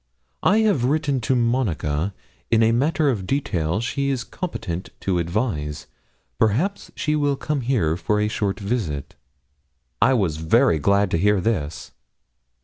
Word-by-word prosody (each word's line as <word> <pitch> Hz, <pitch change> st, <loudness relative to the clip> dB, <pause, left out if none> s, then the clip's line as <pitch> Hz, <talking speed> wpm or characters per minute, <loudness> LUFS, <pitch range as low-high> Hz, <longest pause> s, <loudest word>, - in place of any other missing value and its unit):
I 215 Hz, +3 st, +4 dB
have 200 Hz, -, +2 dB
written 140 Hz, -1 st, +1 dB
to 130 Hz, +4 st, +1 dB
Monica: 100 Hz, -, 0 dB, 0.3 s
in 115 Hz, 0 st, +4 dB
a 110 Hz, -, +4 dB
matter 145 Hz, +4 st, +2 dB
of 100 Hz, -6 st, -4 dB
detail 90 Hz, -, 0 dB
she 140 Hz, +4 st, -1 dB
is 130 Hz, -3 st, -1 dB
competent 95 Hz, -, -5 dB
to 90 Hz, -3 st, 0 dB
advise; 85 Hz, -, -2 dB, 0.5 s
perhaps 140 Hz, -, +1 dB
she 150 Hz, 0 st, 0 dB
will 145 Hz, -2 st, +1 dB
come 150 Hz, 0 st, -2 dB
here 115 Hz, -11 st, +1 dB
for 105 Hz, +4 st, 0 dB
a 105 Hz, -, +1 dB
short 105 Hz, -1 st, -2 dB
visit.' 95 Hz, -, -3 dB, 0.9 s
I 130 Hz, -, +5 dB
was 90 Hz, -9 st, 0 dB
very 80 Hz, 0 st, +3 dB
glad 100 Hz, +4 st, +2 dB
to 85 Hz, -, +1 dB
hear 105 Hz, +2 st, +3 dB
this. 90 Hz, -7 st, -2 dB
110 Hz, 145 wpm, -23 LUFS, 85-135 Hz, 0.9 s, I